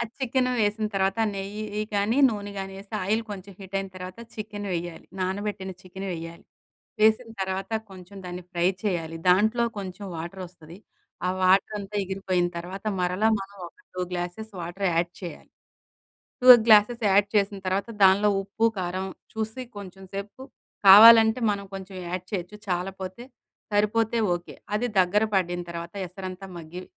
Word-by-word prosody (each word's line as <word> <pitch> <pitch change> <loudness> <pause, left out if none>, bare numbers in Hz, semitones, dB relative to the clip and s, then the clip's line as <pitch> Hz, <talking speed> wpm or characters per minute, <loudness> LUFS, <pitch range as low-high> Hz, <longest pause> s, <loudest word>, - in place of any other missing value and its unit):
ఆ - - +1 0.2
చికెన్ 255 0 +1
వేసిన 215 +1 +1
తర్వాత, 195 +2 +1 0.2
నెయ్యి 210 +2 -4
కానీ 205 +6 +1
నూనె 205 -2 -4
కానీ 195 0 -5
వేసి, 200 +2 -14
ఆయిల్ 220 +4 +1
కొంచెం 200 0 -8
హీట్ 195 0 -11
అయిన 195 - -4
తర్వాత 185 +3 -8 0.2
చికెన్ 210 -1 -6
వేయాలి. 175 -1 -5
నానబెట్టిన 190 +1 -3
చికెన్ 190 +1 -8
వేయ్యాలి. 165 0 -8 0.6
వేసిన 220 +2 +4
తర్వాత, 190 +1 -3 0.2
కొంచెం 190 +1 -12
దాన్ని 180 0 -6
ఫ్రై 175 0 +1 0.2
చేయాలి. 165 -5 -2
దాంట్లో 220 +6 +4
కొంచెం 190 +1 -6
వాటర్ 175 +4 -6
వస్తది. 170 0 -14 0.5
ఆ - - +1
వాటర్ 190 +3 +4
అంతా 200 +1 -7
ఇగిరిపోయిన 185 -2 0
తర్వాత, 185 +4 -7 0.2
మరల 180 +4 0 0.2
మనం 200 +1 -9
ఒక - - -31 0.2
2 185 - -4
గ్లాసెస్ 180 +5 -4
వాటర్ 175 +4 -3
యాడ్ 170 +1 +1
చేయాలి. 175 - -8 0.9
2 255 - +4 0.2
గ్లాసెస్ 220 +2 +6
యాడ్ 200 +1 +4
చేసిన 200 -1 +2
తర్వాత, 195 +4 0 0.2
దానిలో 200 +2 +5
ఉప్పు, 210 +3 0
కారం 185 +1 -2 0.3
చూసి 220 +3 -3 0.2
కొంచెంసేపు 195 +4 -8 0.4
కావాలంటే 220 +3 +10
మనం 200 -1 -2
కొంచెం 190 0 -8
యాడ్ 180 +1 -4
చేయొచ్చు. 195 +2 -4
చాలా 180 +2 0
పోతే 185 +5 -6 0.5
సరిపోతే 220 +2 +2 0.2
ఓకే. 175 0 -7 0.2
అది 225 +4 +1
దగ్గర 185 +4 +3
పడిన 175 -2 +1
తర్వాత, 170 +1 -7
ఎసరంతా 185 +1 -8
మగ్గి 170 +2 -8
195 Hz, 150 wpm, -26 LUFS, 180-210 Hz, 0.9 s, కావాలంటే